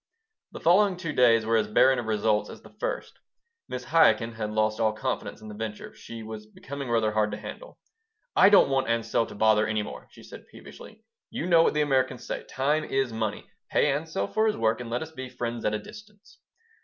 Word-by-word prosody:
The - - -8
following 185 +2 +4
two 165 -4 -4
days 115 -4 +4
were 115 0 +2
as 110 -1 +1
barren 130 +4 +4
of 120 - -5
results 105 -1 +1
as - - -11
the - - -15
first. - - -3 0.6
Mrs. 125 +1 -6
Chaikin 130 -8 +4
had 110 -2 -4
lost 110 0 0
all 110 -1 +2
confidence 110 0 -4
in 110 - -10
the 105 - -8
venture. 105 0 -6
She 115 -1 -10
was 110 -1 -8
becoming 140 +4 -8
rather 115 -2 +1
hard 105 0 +1
to - - -4
handle - - -10 0.6
"I 190 - +7
don't 200 -8 +6
want 135 -2 +1
Ansel 115 0 0
to - - -11
bother 110 0 +3
any 110 -1 -1
more," - - -9
she - - -16
said, - - -12
peevishly. 220 +1 -13 0.3
"You 230 - -4
know 170 -2 +5
what 165 - +2
the 150 - +2
Americans 135 -3 0
say, - - -4
'Time 145 +4 0
is 135 -5 -1
money.' 110 -2 -3 0.2
Pay 150 - +2
Ansel 150 -8 -2
for 220 - +1
his 215 - 0
work 115 +1 +1
and 120 - -7
let 120 +5 -2
us 160 - -10
be 130 -4 -7
'friends 120 -1 -5
at 105 - +1
a - - 0
distance.'" 210 - -14
120 Hz, 215 wpm, -26 LUFS, 110-155 Hz, 0.6 s, I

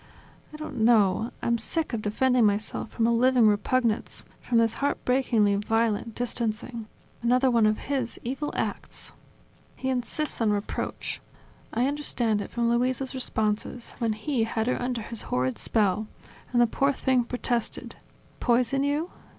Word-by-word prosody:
I 305 - -9
don't 305 -4 -7
know, 220 -1 +4
I'm 235 0 +1
sick 310 +6 -1
of 225 - -1
defending 245 +4 +2
myself 210 +1 0
from 225 - 0
a 235 - +3
living 245 0 +4
repugnance, 220 +2 +1 0.2
from 240 - 0
this 225 -1 +2
heartbreakingly 250 -7 +2
violent 225 +1 0
distancing, 230 -1 -3 0.3
another 250 +2 +3
one 230 -3 +4
of 215 0 +2
his 260 -4 -2
evil 270 +5 -3
acts!... - - -4 0.6
He 265 - -3
insists 260 +3 -2
on 225 - +3
reproach: 205 0 -3 0.5
I 240 +3 +1
understand 245 -7 0
it - - -6
from 235 0 0
Luisa's 255 +2 0
responses, 220 -2 -2
when 230 -2 +1
he 230 +2 -1
had 225 0 -1
her 250 - 0
under 245 -2 -2
his 230 +1 -5
horrid 125 0 0
spell, 215 -1 +1 0.4
and 245 - +2
the 240 - +7
poor 275 +4 +1
thing 260 -2 +2
protested. 240 -1 -2 0.5
"Poison 250 +3 +2
you? 295 +5 -1
235 Hz, 150 wpm, -27 LUFS, 220-255 Hz, 0.6 s, the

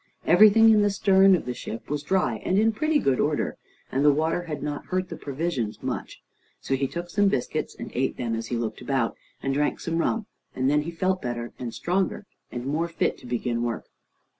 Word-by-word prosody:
Everything 225 +1 +7
in 215 -1 +5
the 205 - +3
stern 195 -1 +5
of 175 - -3
the 125 - -3
ship 115 -1 -7
was 145 0 -2
dry, 185 +5 +1
and 185 - +1
in 220 +2 +4
pretty 305 +8 +1
good 135 - +1
order, 150 0 0 0.4
and 135 +2 +1
the 145 - +7
water 160 +4 0
had 150 -3 -5
not 145 -1 -4
hurt 185 0 -1
the - - -5
provisions 140 -6 -3
much. - - -5 0.4
So - - -3
he 135 +1 +1
took 170 +5 -5
some 205 +1 +3
biscuits, 135 -10 -1
and - - -7
ate - - -1
them 115 -2 -2
as 115 0 -4
he 120 - -2
looked 115 -1 -3
about, 130 -4 0 0.3
and 135 - 0
drank 145 +2 0
some 165 0 -2
rum, 220 +5 0 0.3
and 130 +2 +1
then 150 0 +3
he 155 - -5
felt 185 +2 -1
better, 120 -1 -4
and 120 -2 -4
stronger, 190 - -1 0.3
and 120 0 -5
more 155 +5 0
fit 170 - 0
to - - -12
begin 120 -1 -1
work. 120 -1 -2
150 Hz, 215 wpm, -26 LUFS, 125-190 Hz, 0.4 s, Everything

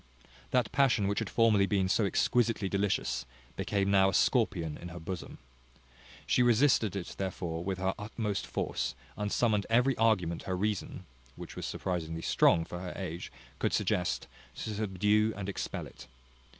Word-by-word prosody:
That 125 -3 +1
passion 125 -6 +3
which 100 0 0
had - - -3
formerly 110 -4 +4
been 95 -3 +1
so 100 +3 +2
exquisitely 115 0 +1
delicious, 100 0 -1 0.3
became 100 -1 0
now 95 -1 +5
a 95 - -1
scorpion 80 -3 +2
in 85 - -7
her 90 0 -8
bosom. 85 +1 -6 0.9
She - - +3
resisted 120 -4 +4
it 95 -3 -5
therefore 90 -3 -3
with 95 0 -2
her 95 0 0
utmost 105 - -3
force, 60 0 -2 0.2
and 105 0 -3
summoned 105 -4 +2
every 125 +3 +3
argument 95 -7 +2
her 90 - 0
reason 105 0 -2 0.3
(which - - -9
was - - -4
surprisingly 80 -3 -3
strong 80 -1 +4
for 90 - -6
her 90 0 -6
age) 90 -3 -5 0.3
could - - 0
suggest, 90 -1 0 0.3
to 110 - -4
subdue 105 +1 +1
and 100 -1 -4
expel 100 - -4
it. - - -13
100 Hz, 160 wpm, -31 LUFS, 90-110 Hz, 0.9 s, now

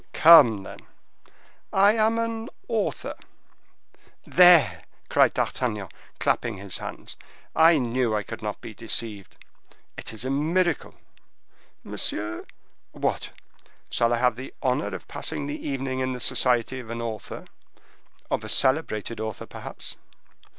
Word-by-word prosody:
"Come, 140 -11 +8
then!" - - -10 0.9
"I 200 +2 +5
am 220 0 +2
an 230 0 -2 0.2
author." 225 -3 -2 1.1
"There!" 175 -4 +6 0.3
cried - - +4
D'Artagnan, 105 -7 -2 0.3
clapping 115 -4 0
his 100 -1 -5
hands, - - -8 0.4
"I 160 0 +6
knew 120 -3 0
I 105 - -1
could - - -8
not 105 -1 -5
be 110 - -8
deceived! 105 -2 -4 0.6
It - - -4
is 110 +3 -5
a 130 - -1
miracle!" 165 +3 0 0.9
"Monsieur—" 105 +1 -3 0.5
"What, - - -2 0.6
shall 115 0 +2
I 120 - +2
have 125 -1 +2
the 130 +1 -7
honor 125 -5 +1
of - - -7
passing - - -4
the 145 +1 -5
evening 135 -1 -2
in 130 0 -1
the 125 - -6
society 125 +1 +1
of 120 -3 -10
an 115 0 -4
author, 110 -3 -6 0.9
of - - 0
a - - -6
celebrated 120 -6 +1
author, 110 -2 -5
perhaps?" - - -8
125 Hz, 130 wpm, -25 LUFS, 110-160 Hz, 1.1 s, Come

